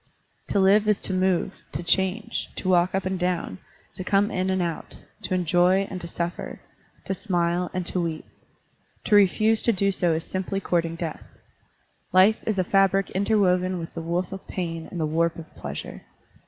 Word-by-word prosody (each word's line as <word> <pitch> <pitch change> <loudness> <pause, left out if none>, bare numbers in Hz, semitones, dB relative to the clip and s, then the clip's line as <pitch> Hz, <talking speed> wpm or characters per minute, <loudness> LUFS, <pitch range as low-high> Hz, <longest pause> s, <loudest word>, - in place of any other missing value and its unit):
To 200 - +1
live 200 +2 +4
is 210 -2 +3
to 190 - -2
move, 185 +1 +1 0.2
to - - -3
change, 190 +5 0
to - - -5
walk 180 0 +3
up 195 - -1
and 185 -1 -2
down, 180 - -2 0.3
to 185 - -3
come 200 +3 +2
in 185 +1 -1
and 190 0 +1
out, 170 -2 -4 0.3
to 185 - 0
enjoy 180 +2 +3
and 185 -2 -5
to 170 - -6
suffer, 170 +1 -4 0.5
to - - -1
smile 175 -3 0
and 185 -1 -3
to 180 - -1
weep. 165 -2 -3 0.8
To 210 - +3
refuse 215 +3 +4
to 235 - +4
do 200 -1 +1
so 175 -3 +1
is 160 +1 -2
simply 190 +2 -3
cotirting 170 -3 0
death. 165 -2 -4 0.9
Life 190 +4 +5
is 215 -3 0
a 185 - +2
fabric 195 +1 +2
interwoven 185 -2 +2
with 165 -1 -7
the 165 - -5
woof 170 +2 -2
of 195 0 -8
pain 165 -3 -4
and 175 - -6
the 160 - +1
warp 165 +2 +1
of 160 -1 -11
pleasure. - - -7
185 Hz, 185 wpm, -25 LUFS, 170-195 Hz, 0.9 s, Life